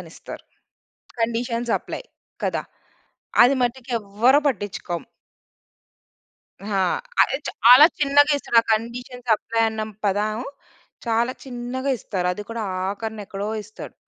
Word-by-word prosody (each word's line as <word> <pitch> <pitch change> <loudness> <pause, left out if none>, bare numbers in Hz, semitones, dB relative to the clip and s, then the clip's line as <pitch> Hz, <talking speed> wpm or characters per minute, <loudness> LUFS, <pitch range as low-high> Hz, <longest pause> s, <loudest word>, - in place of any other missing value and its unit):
అనిస్తారు. - - -11 0.8
Conditions 235 0 -1
apply - - -7 0.4
కదా! - - -1 0.8
అది 250 +3 +5
మటికెవ్వరు 240 0 +1
పట్టించుకోం. 195 - -4 1.6
ఆ! 200 -1 -1 0.4
అది 270 - +1
చాలా 250 +6 +8
చిన్నగా 290 +1 +5
ఇస్తారు. 235 - +2
ఆ - - -31
కండిషన్స్ 245 +2 -3
అప్లై 225 +1 -1
అన్న 220 0 -4 0.2
పదం 210 +2 0 0.7
చాలా 235 +2 +1
చిన్నగా 255 +2 -4
ఇస్తారు. 185 -4 -2
అది 210 - -6
కూడా 230 -1 -3 0.3
ఆఖరిన 220 +2 -5
ఎక్కడో 200 +2 -4
ఇస్తాడు. 215 +1 -11
230 Hz, 105 wpm, -23 LUFS, 210-250 Hz, 1.6 s, చాలా